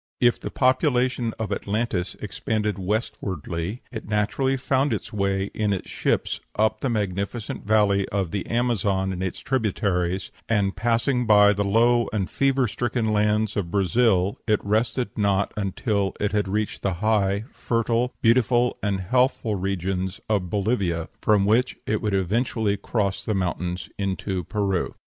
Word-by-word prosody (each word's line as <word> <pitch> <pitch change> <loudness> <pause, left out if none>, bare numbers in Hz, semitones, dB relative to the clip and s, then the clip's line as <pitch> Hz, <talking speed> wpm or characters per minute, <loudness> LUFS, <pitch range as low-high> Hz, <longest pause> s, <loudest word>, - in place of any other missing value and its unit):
If 120 -1 +3
the - - -5
population 130 -2 +1
of 110 -2 -3
Atlantis 100 -4 -2
expanded 105 -3 -2
westwardly, 95 - -3
it 110 -3 -7
naturally 110 +6 +1
found 135 +2 +1
its - - -5
way 100 -1 0
in 105 -1 0
its 95 - -5
ships - - -1
up 110 +1 +2
the 135 - 0
magnificent 105 0 -3
valley 105 -2 +3
of 95 -4 -1
the 100 - -3
Amazon 100 -5 0
and 90 - -5
its 95 -1 -3
tributaries; 95 -7 -1 0.2
and, 100 -3 +1
passing 120 +2 +1
by 105 -1 +7
the 100 0 0
low 115 +4 +3
and 100 -4 -1
fever 135 -2 +2
stricken 110 0 -1
lands 105 +1 +1
of 95 -5 -2
Brazil, 100 0 +2
it 105 -2 +3
rested 110 +2 0
not 100 -1 +1
until 100 -1 -1
it 105 0 0
had 105 -1 0
reached 105 +2 -2
the 100 - 0
high, 100 +1 +1
fertile, 115 +1 0
beautiful, 120 +1 +3
and 100 -2 -1
healthful 125 +2 +1
regions 95 -1 -2
of 100 -5 0
Bolivia, 95 -5 0
from 105 -2 +3
which 115 +5 +2
it 105 0 0
would 105 -2 0
eventually 105 +2 0
cross 100 -1 -1
the 110 - -1
mountains 90 -1 -2
into 95 -1 -2
Peru. 100 -3 -1
105 Hz, 150 wpm, -24 LUFS, 95-115 Hz, 0.2 s, by